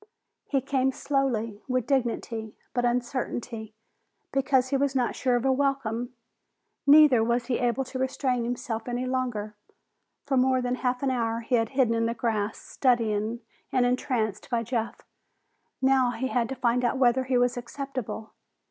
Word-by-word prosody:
He 275 Hz, -2 st, +1 dB
came 265 Hz, 0 st, +1 dB
slowly, 240 Hz, -7 st, -1 dB
with 255 Hz, -3 st, 0 dB
dignity, 235 Hz, -4 st, -1 dB, 0.2 s
but 245 Hz, -1 st, +1 dB
uncertainly, 240 Hz, -2 st, -2 dB, 0.6 s
because 265 Hz, -1 st, +2 dB
he 275 Hz, -, +1 dB
was 275 Hz, 0 st, +1 dB
not 250 Hz, -2 st, +1 dB
sure 250 Hz, -2 st, +1 dB
of 240 Hz, +1 st, 0 dB
a 265 Hz, -, +4 dB
welcome. 260 Hz, -3 st, -1 dB, 0.7 s
Neither 285 Hz, -5 st, +7 dB
was 235 Hz, +1 st, +1 dB
he 240 Hz, 0 st, -1 dB
able 245 Hz, +2 st, +1 dB
to 260 Hz, 0 st, -6 dB
restrain 260 Hz, -2 st, 0 dB
himself 235 Hz, -1 st, -3 dB
any 245 Hz, +1 st, -2 dB
longer. 245 Hz, -5 st, -2 dB, 0.7 s
For 275 Hz, -2 st, +1 dB
more 260 Hz, 0 st, +3 dB
than 250 Hz, 0 st, -1 dB
a -, -, -13 dB
half 250 Hz, 0 st, -1 dB
hour 235 Hz, -4 st, 0 dB
he 230 Hz, -, -5 dB
had 225 Hz, -2 st, +3 dB
hidden 245 Hz, -4 st, +4 dB
in 230 Hz, 0 st, +1 dB
the 230 Hz, -, -2 dB
grass, 220 Hz, -2 st, -1 dB
studying 230 Hz, -3 st, 0 dB, 0.3 s
and 255 Hz, -1 st, +3 dB
entranced 245 Hz, -4 st, -1 dB
by 235 Hz, -2 st, 0 dB
Jeff. 230 Hz, 0 st, -3 dB, 0.8 s
Now 265 Hz, -1 st, +4 dB
he 250 Hz, +2 st, -2 dB
had 240 Hz, -3 st, 0 dB
to 265 Hz, -, -3 dB
find 245 Hz, 0 st, +1 dB
out 245 Hz, +2 st, +1 dB
whether 260 Hz, 0 st, +3 dB
he 255 Hz, -1 st, +1 dB
was 245 Hz, 0 st, +2 dB
acceptable. 245 Hz, -2 st, -6 dB
245 Hz, 165 wpm, -27 LUFS, 230-260 Hz, 0.8 s, Neither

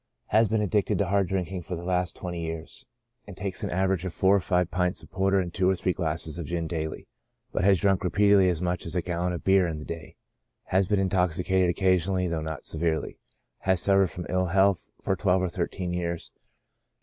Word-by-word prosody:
II7. -, -, -54 dB
Has 110 Hz, +2 st, +5 dB
been 110 Hz, +1 st, +1 dB
addicted 105 Hz, 0 st, +1 dB
to 100 Hz, -, +1 dB
hard 100 Hz, -1 st, +2 dB
drinking 95 Hz, 0 st, -2 dB
for 90 Hz, +2 st, -5 dB
the 85 Hz, -, -7 dB
last 90 Hz, 0 st, 0 dB
twenty 85 Hz, -2 st, -5 dB
years, 80 Hz, 0 st, -6 dB, 0.4 s
and 100 Hz, -3 st, -10 dB
takes 95 Hz, -1 st, -4 dB
on -, -, -1 dB
an -, -, -3 dB
average 95 Hz, -2 st, +1 dB
four 95 Hz, +2 st, +3 dB
or -, -, +4 dB
five 90 Hz, -1 st, 0 dB
pints 90 Hz, 0 st, 0 dB
of -, -, -16 dB
porter 95 Hz, +1 st, +2 dB
and 90 Hz, -2 st, -3 dB
tvi^o 95 Hz, -1 st, +1 dB
or 95 Hz, -, +3 dB
three 90 Hz, 0 st, 0 dB
glasses 80 Hz, -1 st, -3 dB
of 80 Hz, -, -5 dB
gin 85 Hz, -1 st, -2 dB
daily; 80 Hz, -2 st, -4 dB, 0.4 s
but -, -, -1 dB
has 95 Hz, -2 st, +5 dB
drunk 100 Hz, -2 st, +2 dB
repeat 100 Hz, +3 st, +3 dB
edly 95 Hz, -2 st, +5 dB
as 90 Hz, -1 st, -1 dB
much 90 Hz, -1 st, -2 dB
as 85 Hz, -, -6 dB
a 90 Hz, -, 0 dB
gallon 90 Hz, 0 st, -1 dB
of 85 Hz, -, -5 dB
beer 95 Hz, -2 st, +4 dB
in 80 Hz, -2 st, -3 dB
the 75 Hz, -, -8 dB
day. 80 Hz, -1 st, -7 dB, 0.5 s
Has 95 Hz, 0 st, +1 dB
been 105 Hz, -1 st, +2 dB
intoxicated 90 Hz, -1 st, +1 dB
occasionally, 95 Hz, 0 st, +1 dB
though 85 Hz, -2 st, -2 dB
not 80 Hz, -2 st, -5 dB
severely; 80 Hz, -1 st, -1 dB, 0.4 s
has 95 Hz, -2 st, +1 dB
suffered 95 Hz, 0 st, +3 dB
from 85 Hz, +2 st, -7 dB
ill 90 Hz, 0 st, 0 dB
health 95 Hz, +1 st, +2 dB
for 95 Hz, -, +1 dB
tvi^elve 95 Hz, 0 st, +2 dB
or 90 Hz, -, 0 dB
thirteen 90 Hz, +1 st, -3 dB
years. 85 Hz, -1 st, -3 dB
90 Hz, 220 wpm, -27 LUFS, 85-95 Hz, 0.5 s, Has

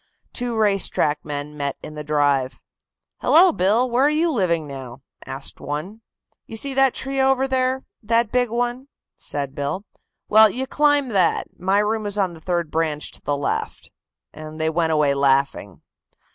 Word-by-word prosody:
Two 245 Hz, -2 st, -2 dB
race 205 Hz, -3 st, +3 dB
track 150 Hz, 0 st, 0 dB
men 145 Hz, 0 st, -5 dB
met 140 Hz, -2 st, -3 dB
in 150 Hz, -, -8 dB
the 150 Hz, 0 st, -6 dB
drive. 145 Hz, -3 st, +1 dB, 0.6 s
"Hello, 355 Hz, +3 st, +6 dB
Bill; 220 Hz, -, +2 dB
where 250 Hz, +3 st, +2 dB
are -, -, +5 dB
you 320 Hz, +2 st, +1 dB
living 175 Hz, -, 0 dB
now?" 135 Hz, -2 st, -9 dB, 0.2 s
asked 135 Hz, +1 st, -6 dB
one. 165 Hz, +10 st, -5 dB, 0.5 s
"You 225 Hz, -, -7 dB
see 275 Hz, +4 st, -2 dB
that 270 Hz, -1 st, +3 dB
tree 270 Hz, 0 st, -2 dB
over 265 Hz, 0 st, +2 dB
there 260 Hz, 0 st, 0 dB, 0.2 s
that 230 Hz, 0 st, +1 dB
big 245 Hz, -1 st, +1 dB
one?" 245 Hz, +3 st, -2 dB, 0.3 s
said 140 Hz, -2 st, -3 dB
Bill. 145 Hz, +8 st, -3 dB, 0.4 s
"Well, 220 Hz, 0 st, +7 dB
you 255 Hz, +6 st, -3 dB
climb 290 Hz, -1 st, +2 dB
that. 190 Hz, -6 st, +1 dB
My 190 Hz, +2 st, +1 dB
room 210 Hz, +1 st, 0 dB
is 205 Hz, 0 st, -3 dB
on 190 Hz, -4 st, 0 dB
the 160 Hz, -, -13 dB
third 170 Hz, -2 st, -2 dB
branch 155 Hz, -2 st, -1 dB
to -, -, -15 dB
the 145 Hz, -1 st, -1 dB
left," 140 Hz, -, -3 dB, 0.4 s
and 155 Hz, +1 st, -9 dB
they 160 Hz, 0 st, +1 dB
went 165 Hz, 0 st, +1 dB
away 150 Hz, -3 st, +3 dB
laughing. 135 Hz, -8 st, 0 dB
190 Hz, 175 wpm, -22 LUFS, 150-245 Hz, 0.6 s, Well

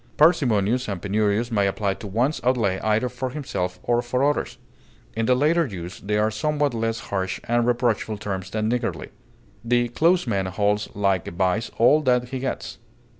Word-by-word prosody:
Parsimonious 125 Hz, -, +3 dB
and 100 Hz, -3 st, -3 dB
penurious 105 Hz, +4 st, 0 dB
may 100 Hz, -3 st, +2 dB
apply 100 Hz, 0 st, -1 dB
to 100 Hz, +2 st, -9 dB
one's 120 Hz, +10 st, 0 dB
outlay 115 Hz, -7 st, +1 dB
either 110 Hz, +3 st, +1 dB
for 125 Hz, +1 st, -4 dB
himself 90 Hz, -10 st, -4 dB
or 120 Hz, 0 st, +2 dB
for 125 Hz, +3 st, +1 dB
others; 145 Hz, -, -1 dB, 0.6 s
in 115 Hz, 0 st, -1 dB
the 125 Hz, -, +4 dB
latter 155 Hz, +4 st, +2 dB
use, 90 Hz, -5 st, -7 dB
they 105 Hz, +1 st, -1 dB
are 105 Hz, +1 st, +2 dB
somewhat 145 Hz, +5 st, 0 dB
less 115 Hz, 0 st, -1 dB
harsh 95 Hz, -1 st, -1 dB
and 120 Hz, 0 st, +1 dB
reproachful 120 Hz, -3 st, 0 dB
terms 95 Hz, -2 st, -4 dB
than 110 Hz, +1 st, -1 dB
niggardly. 120 Hz, +1 st, -2 dB, 0.5 s
The 120 Hz, 0 st, +1 dB
close 170 Hz, +8 st, +2 dB
man 100 Hz, -5 st, -1 dB
holds 105 Hz, +2 st, 0 dB
like 100 Hz, -3 st, +1 dB
a -, -, -4 dB
vise 95 Hz, +5 st, 0 dB
all 145 Hz, +7 st, +5 dB
that 125 Hz, -3 st, +1 dB
he 130 Hz, 0 st, -4 dB
gets. 130 Hz, -, -4 dB
115 Hz, 175 wpm, -23 LUFS, 100-125 Hz, 0.6 s, all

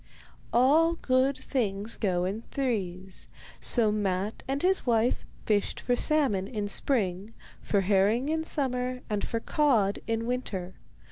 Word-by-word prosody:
All 310 Hz, +7 st, +4 dB
good 260 Hz, -2 st, +1 dB
things 215 Hz, -4 st, -2 dB
go 180 Hz, -4 st, 0 dB
in 200 Hz, +4 st, -3 dB
threes, 190 Hz, -8 st, -2 dB, 0.3 s
so 225 Hz, -4 st, +3 dB
Matte 200 Hz, 0 st, -1 dB
and 275 Hz, +3 st, -2 dB
his 380 Hz, +1 st, +2 dB
wife 235 Hz, 0 st, +1 dB, 0.2 s
fished 205 Hz, -2 st, 0 dB
for 245 Hz, -, 0 dB
salmon 250 Hz, -10 st, +1 dB
in 210 Hz, -3 st, -3 dB
spring, 200 Hz, -3 st, 0 dB, 0.3 s
for 200 Hz, -, +1 dB
herring 205 Hz, +6 st, +2 dB
in 320 Hz, +1 st, 0 dB
summer, 255 Hz, -4 st, -1 dB
and 205 Hz, -1 st, -1 dB
for 230 Hz, -, -2 dB
cod 225 Hz, -8 st, +2 dB
in 225 Hz, 0 st, -1 dB
winter. 200 Hz, -7 st, -3 dB
225 Hz, 135 wpm, -28 LUFS, 200-260 Hz, 0.3 s, All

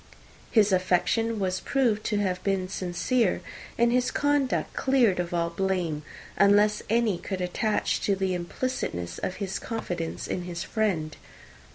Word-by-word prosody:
His 210 Hz, -3 st, +4 dB
affection 185 Hz, +5 st, +2 dB
was 185 Hz, -2 st, -1 dB
proved 235 Hz, -6 st, +1 dB
to 210 Hz, -, 0 dB
have 185 Hz, -3 st, -1 dB
been 195 Hz, -2 st, 0 dB
sincere, 190 Hz, +5 st, 0 dB, 0.4 s
and 235 Hz, 0 st, +4 dB
his 250 Hz, +1 st, +2 dB
conduct 290 Hz, -2 st, +1 dB
cleared 245 Hz, -9 st, +3 dB
of 175 Hz, -1 st, -2 dB
all 170 Hz, -1 st, 0 dB
blame, 175 Hz, -4 st, -1 dB, 0.4 s
unless 205 Hz, +1 st, +4 dB
any 225 Hz, -5 st, +2 dB
could 190 Hz, -2 st, -4 dB
attach 195 Hz, +4 st, 0 dB
to 200 Hz, -, +2 dB
the 190 Hz, -1 st, 0 dB
implicitness 175 Hz, -, -3 dB
of 185 Hz, -, -3 dB
his 195 Hz, -2 st, -3 dB
confidence 175 Hz, -8 st, -4 dB
in 180 Hz, -, -3 dB
his 170 Hz, -1 st, -4 dB
friend. 180 Hz, -9 st, -1 dB
195 Hz, 145 wpm, -27 LUFS, 180-225 Hz, 0.4 s, His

